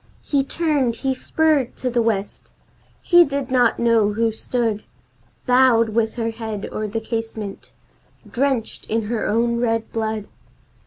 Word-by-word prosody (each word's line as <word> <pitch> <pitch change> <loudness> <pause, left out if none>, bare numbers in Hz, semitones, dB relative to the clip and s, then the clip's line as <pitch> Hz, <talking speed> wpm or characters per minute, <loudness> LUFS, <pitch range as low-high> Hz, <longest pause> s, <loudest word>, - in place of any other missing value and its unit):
He 280 -2 +1
turned, 280 -5 0
he 265 +3 -1
spurred 295 -1 +1
to 255 - -3
the 240 0 +2
West; 210 -3 -2 0.5
he 350 -1 +7
did 280 -4 -3
not 245 -3 +3
know 230 -3 +3
who 225 +1 +1
stood 220 -1 -2 0.6
Bowed, 250 -3 +4
with 220 0 0
her 230 -2 -2
head 220 -2 -5
o'er 215 - -3
the 220 +2 -3
casement, 225 -2 -5 0.6
drenched 260 -3 -2
in 225 +1 0
her 220 +1 -2
own 235 +2 +1
red 225 -2 -1
blood! 220 -2 -3
230 Hz, 145 wpm, -21 LUFS, 220-255 Hz, 0.6 s, he